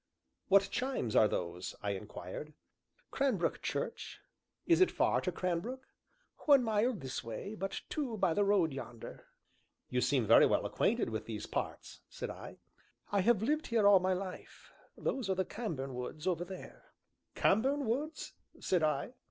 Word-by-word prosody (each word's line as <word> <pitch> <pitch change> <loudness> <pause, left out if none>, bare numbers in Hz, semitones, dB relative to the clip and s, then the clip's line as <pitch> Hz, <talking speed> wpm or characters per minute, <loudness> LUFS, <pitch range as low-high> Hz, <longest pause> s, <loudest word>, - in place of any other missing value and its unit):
"What 195 0 +5
chimes 255 - -1
are 110 - +7
those?" 90 -2 -4
I 100 - 0
inquired. 100 +8 -7 0.6
"Cranbrook 255 -11 0
Church." - - -4 0.5
"Is 340 +1 +4
it 370 - +6
far - - +2
to - - -1
Cranbrook?" 205 +9 -3 0.6
"One 280 -3 +7
mile 225 +2 +2
this 135 -8 -5
way, 115 - -6
but 195 -2 -4
two 260 -7 -3
by 190 -4 +2
the 205 - +2
road 195 -7 +3
yonder." 120 -4 -8 0.6
"You 125 0 +1
seem 130 -4 +2
very - - +7
well - - +1
acquainted - - +1
with - - -4
these - - -5
parts," - - -4
said - - -5
I. - - -10 0.5
"I 200 -1 +3
have 215 +1 +3
lived 305 +6 0
here 225 -3 +3
all 200 -2 +8
my 185 +1 +1
life; 185 0 -7 0.3
those 250 -7 -2
are 190 - +2
the 190 0 0
Cambourne 155 - -4
Woods 125 +6 -6
over 175 -2 0
there 185 0 -11 0.2
" - - -50
"Cambourne 270 +7 +2
Woods!" 290 +8 -2 0.3
said 180 -3 +1
I. 155 - 0
195 Hz, 160 wpm, -33 LUFS, 150-240 Hz, 0.6 s, all